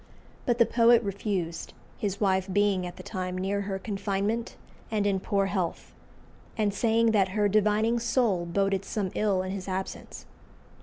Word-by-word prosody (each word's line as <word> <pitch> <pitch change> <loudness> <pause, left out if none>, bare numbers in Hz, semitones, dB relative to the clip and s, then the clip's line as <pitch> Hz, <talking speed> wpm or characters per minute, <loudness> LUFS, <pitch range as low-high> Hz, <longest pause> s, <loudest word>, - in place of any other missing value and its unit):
But 240 -2 +2
the 235 - +6
poet 235 0 +5
refused, 195 -4 -3 0.2
his 200 -1 -3
wife 190 -2 +1
being 200 -2 +2
at 175 - -8
the - - -9
time 185 -2 -4
near 195 +2 -1
her 195 -1 -3
confinement 200 +3 -2 0.3
and 210 -2 0
in 195 -2 +1
poor 195 +1 0
health, 190 -3 -3 0.6
and 210 -2 +1
saying 230 +2 +2
that 195 -3 +3
"her 205 -1 +4
divining 215 +3 +2
soul 230 -7 +1
boded 195 +2 0
some 195 -2 -3
ill 200 -3 +1
in 185 - -4
his 195 -1 -5
absence." 190 0 -5
200 Hz, 160 wpm, -28 LUFS, 190-215 Hz, 0.6 s, the